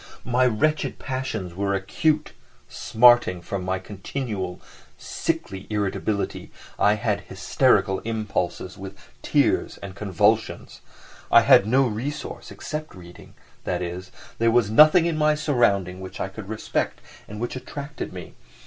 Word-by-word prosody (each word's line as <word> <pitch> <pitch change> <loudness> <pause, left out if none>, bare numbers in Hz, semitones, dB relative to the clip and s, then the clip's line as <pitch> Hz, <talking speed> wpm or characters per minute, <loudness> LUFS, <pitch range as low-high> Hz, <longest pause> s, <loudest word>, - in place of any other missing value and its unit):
My 125 +1 +3
wretched 150 +7 0
passions 130 -9 -4
were 100 +2 -1
acute, 150 +11 0 0.3
smarting, 120 -5 +4
from 90 +2 -5
my 95 +1 -1
continual, 100 0 -5 0.4
sickly 95 0 -4
irritability 105 0 -2 0.3
I 105 +1 +4
had 105 -2 -1
hysterical 95 -1 +1
impulses, 105 -5 -3
with 95 -1 -8 0.2
tears - - +1
and 100 -1 -8
convulsions. 105 +2 0 0.5
I - - +8
had 100 - +6
no 130 +4 +4
resource 130 +6 -5
except 155 -4 -6
reading, 90 -1 -14 0.3
that 90 0 -2
is, 90 +1 -6 0.3
there 115 0 +3
was 115 -3 +2
nothing 155 +7 +7
in 165 -2 -1
my 150 0 +3
surroundings 100 - +1
which 95 0 -8
I 95 - -2
could 100 0 -10
respect 110 - -2 0.3
and 105 0 -8
which 120 +2 -3
attracted 140 +3 -7
me. - - -9
105 Hz, 130 wpm, -24 LUFS, 95-130 Hz, 0.5 s, I